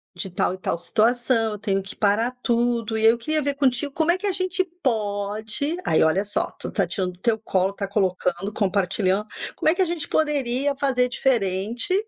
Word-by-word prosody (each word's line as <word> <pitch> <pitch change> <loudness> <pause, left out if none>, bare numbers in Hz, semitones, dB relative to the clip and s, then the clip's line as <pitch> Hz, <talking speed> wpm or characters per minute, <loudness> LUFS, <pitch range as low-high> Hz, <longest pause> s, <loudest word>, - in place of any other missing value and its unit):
de 180 +2 -4
tal 180 0 0
e - - -6
tal 185 - -2
situação, 230 +3 +1
eu 210 - -7
tenho 195 -2 0
que 195 - -7
parar 220 +4 +2
tudo, 235 -2 +1
e - - -1
aí, 225 - +8
eu 235 - -2
queria 310 +6 0
ver 285 0 0
contigo, 275 0 +1
como 320 +2 +2
é 350 - +1
que 410 - -3
a 395 - +2
gente 370 0 0 0.2
pode" 215 - -1
Aí, 160 - +3
olha 180 +6 +2
só, 205 - -2
tu - - -5
tá 195 - +1
tirando 180 +1 -1
do 180 - -21
teu 230 -1 +2
colo, 190 -3 0
tá 200 0 -4
colocando, 190 -1 -1
compartilhando: 195 0 0 0.3
"Como - - +2
é 320 - +3
que 380 - 0
a - - +4
gente 330 -4 -3
poderia 280 -2 +1
fazer 265 -3 +1
diferente, 230 - 0
225 Hz, 210 wpm, -23 LUFS, 195-275 Hz, 0.3 s, aí